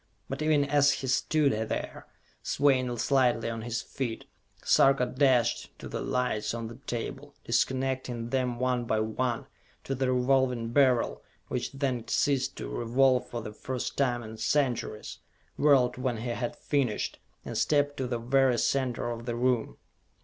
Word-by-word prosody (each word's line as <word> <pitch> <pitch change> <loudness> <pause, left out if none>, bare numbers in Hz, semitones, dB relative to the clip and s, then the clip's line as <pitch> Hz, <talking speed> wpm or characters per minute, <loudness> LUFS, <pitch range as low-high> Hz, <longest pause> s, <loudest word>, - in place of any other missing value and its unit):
But 135 +2 -5
even 155 -2 +3
as 145 0 +4
he 135 - -4
stood 140 +2 +2 0.2
there, - - -4 0.3
swaying 130 -4 +1
slightly 125 -2 +2
on 115 0 -5
his 115 0 -3
feet, 120 -4 -4 0.4
Sarka 135 -2 +4
dashed 125 -2 +1
to - - -8
the - - -4
lights 125 -3 -1
on 115 -1 -4
the 115 +1 -10
table, 135 +4 -5
disconnecting 130 -1 -1
them 125 -2 0
one 125 -1 0
by 110 -1 +1
one; 115 +2 -1 0.4
to 135 - -3
the 130 -1 0
Revolving 125 -2 +2
Beryl, 130 -1 +2 0.3
which 125 -1 -2
then 135 -4 -2
ceased 135 -2 +1
to - - -6
revolve 125 +2 +2
for 120 -2 -5
the 105 - -7
first 130 +3 -4
time 125 -3 0
in 110 0 -9
centuries 120 -3 -1 0.4
whirled 135 -5 +4
when 125 -2 -1
he 120 +3 -4
had 120 +4 -3
finished, 135 -8 -1 0.3
and - - -5
stepped 145 -1 +1
to 130 - -2
the 120 -1 -1
very 125 +1 +2
center 125 -2 0
of 115 +1 -7
the 120 - -1
room. 125 -1 0
125 Hz, 155 wpm, -28 LUFS, 120-135 Hz, 0.4 s, as